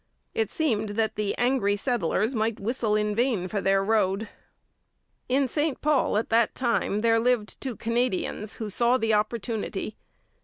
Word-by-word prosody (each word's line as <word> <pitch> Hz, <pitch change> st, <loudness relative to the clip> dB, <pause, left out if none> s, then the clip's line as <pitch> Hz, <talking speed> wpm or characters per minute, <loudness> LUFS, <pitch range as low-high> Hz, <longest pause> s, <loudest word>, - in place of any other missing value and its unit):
It 220 Hz, -2 st, 0 dB
seemed 220 Hz, -9 st, 0 dB
that 220 Hz, -1 st, +1 dB
the 210 Hz, -1 st, -2 dB
angry 245 Hz, -5 st, +2 dB
settlers 220 Hz, 0 st, 0 dB
might 220 Hz, -1 st, -1 dB
whistle 220 Hz, 0 st, 0 dB
in 210 Hz, 0 st, +1 dB
vain 225 Hz, -5 st, 0 dB
for 200 Hz, +1 st, -2 dB
their 195 Hz, 0 st, +2 dB
road. 210 Hz, 0 st, +1 dB, 1.0 s
In 270 Hz, +1 st, +2 dB
St 295 Hz, +3 st, -1 dB
Paul 290 Hz, -7 st, +2 dB
at 220 Hz, -, -1 dB
that 230 Hz, 0 st, +2 dB
time 235 Hz, -4 st, 0 dB
there 225 Hz, 0 st, +3 dB
lived 235 Hz, -2 st, 0 dB
two 260 Hz, -4 st, -4 dB
Canadians 230 Hz, -2 st, -1 dB
who 220 Hz, -, -5 dB
saw 235 Hz, +5 st, +3 dB
the 225 Hz, -3 st, +1 dB
opportunity. 215 Hz, -1 st, -2 dB
225 Hz, 155 wpm, -26 LUFS, 210-245 Hz, 1.0 s, there